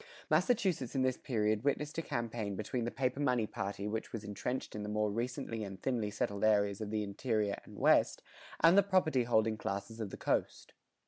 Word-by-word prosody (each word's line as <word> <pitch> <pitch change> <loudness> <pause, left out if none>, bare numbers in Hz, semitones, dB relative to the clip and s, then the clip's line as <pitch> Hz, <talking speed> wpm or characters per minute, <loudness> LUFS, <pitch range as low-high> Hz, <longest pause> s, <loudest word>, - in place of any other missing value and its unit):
Massachusetts 185 - +2
in 130 - +2
this 130 -1 +1
period 110 -3 0
witnessed 150 +2 0
a - - 0
campaign 115 -7 -3
between 115 +4 -2
the - - 0
paper 130 +2 -1
money 125 -6 +2
party 100 0 -4
which 110 +1 -3
was 115 -2 -5
entrenched 110 +5 -4
in 105 - -4
the 105 - -4
more 105 0 +1
recently 115 0 -3
and 95 -2 -7
thinly 115 -2 -1
settled 100 -1 -2
areas 100 -1 +3
of 105 - -3
the 105 0 -1
interior 105 0 -1
and - - -12
west, - - +3 0.4
and 165 +3 +7
the 200 - +8
property 180 -10 +2
holding 110 -2 +2
classes 105 +3 -4
of 110 -3 -3
the - - -8
coast. - - -1
110 Hz, 195 wpm, -34 LUFS, 105-130 Hz, 0.4 s, the